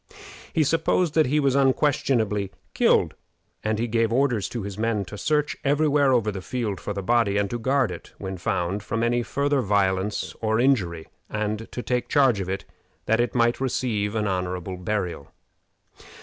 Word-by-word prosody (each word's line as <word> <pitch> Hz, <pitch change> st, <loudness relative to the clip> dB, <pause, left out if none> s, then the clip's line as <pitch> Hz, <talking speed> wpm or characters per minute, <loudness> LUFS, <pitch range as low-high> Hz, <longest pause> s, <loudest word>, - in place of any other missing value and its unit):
He 160 Hz, -, +2 dB
supposed 165 Hz, +2 st, +1 dB
that 155 Hz, -3 st, +4 dB
he 150 Hz, +4 st, +2 dB
was 140 Hz, -3 st, +2 dB
unquestionably 130 Hz, -7 st, +2 dB, 0.2 s
killed, -, -, +3 dB, 0.5 s
and 110 Hz, 0 st, 0 dB
he 115 Hz, +2 st, -1 dB
gave 115 Hz, 0 st, +1 dB
orders 125 Hz, -5 st, +1 dB
to 120 Hz, -4 st, -4 dB
his 100 Hz, -1 st, -5 dB
men 110 Hz, -1 st, -1 dB
to 105 Hz, -, -9 dB
search 150 Hz, +6 st, 0 dB
every 145 Hz, +2 st, +2 dB
where 140 Hz, -2 st, +3 dB
over 115 Hz, -4 st, +2 dB
the 95 Hz, -2 st, -6 dB
field 105 Hz, -3 st, -3 dB
for 105 Hz, -, -4 dB
the 100 Hz, -1 st, -4 dB
body, 115 Hz, -1 st, +2 dB
and 100 Hz, 0 st, +1 dB
to 120 Hz, -, -2 dB
guard 130 Hz, -2 st, +1 dB
it, 85 Hz, -, -9 dB
when 95 Hz, -1 st, -5 dB
found, 90 Hz, +4 st, -1 dB
from 115 Hz, +3 st, -2 dB
any 120 Hz, +1 st, +2 dB
farther 140 Hz, +3 st, 0 dB
violence 100 Hz, -1 st, 0 dB
or 110 Hz, 0 st, +1 dB
injury, 95 Hz, -11 st, +1 dB, 0.2 s
and 110 Hz, +1 st, -2 dB
take 125 Hz, 0 st, -2 dB
charge 135 Hz, -7 st, +4 dB
of 95 Hz, -1 st, -3 dB
it, 95 Hz, +1 st, -3 dB, 0.4 s
that 110 Hz, +1 st, +2 dB
it 120 Hz, +1 st, 0 dB
might 120 Hz, 0 st, +2 dB
receive 115 Hz, -5 st, -1 dB
an 105 Hz, -1 st, 0 dB
honorable 90 Hz, -1 st, -2 dB
burial. 90 Hz, -5 st, -3 dB
115 Hz, 180 wpm, -25 LUFS, 100-130 Hz, 0.5 s, that